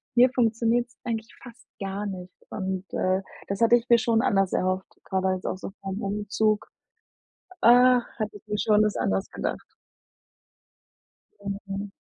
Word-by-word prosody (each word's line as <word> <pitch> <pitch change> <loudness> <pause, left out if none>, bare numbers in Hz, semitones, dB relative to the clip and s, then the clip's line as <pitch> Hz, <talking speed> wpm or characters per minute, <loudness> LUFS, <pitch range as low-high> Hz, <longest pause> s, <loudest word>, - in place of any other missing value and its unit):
hier 250 +2 +7
funktioniert's 235 0 +1
eigentlich 225 -2 -4
fast 245 -2 -14
gar 195 +1 -3
nicht 185 -2 -7 0.2
und, 190 -1 -3
äh, 185 +1 +1 0.3
das 195 +1 -3
hatte 230 +1 +6
ich 240 +1 -1
mir 235 - +7
schon 225 +1 +2
anders 195 -2 +2
erhofft, 185 +1 0 0.2
gerade 190 0 -1
auch 190 - +2
jetzt 185 0 -4
so - - -5
vorm 195 +2 -4
Umzug. 210 +1 0 0.9
Ach, 245 +1 +6
hatte 215 -2 -3
ich 215 - -24
mir 210 0 -2
schon 210 0 +3
das 210 -1 +1
anders 95 0 -1
gedacht. - - -3 1.8
Mhm. 200 0 -5
210 Hz, 150 wpm, -26 LUFS, 195-230 Hz, 1.8 s, hier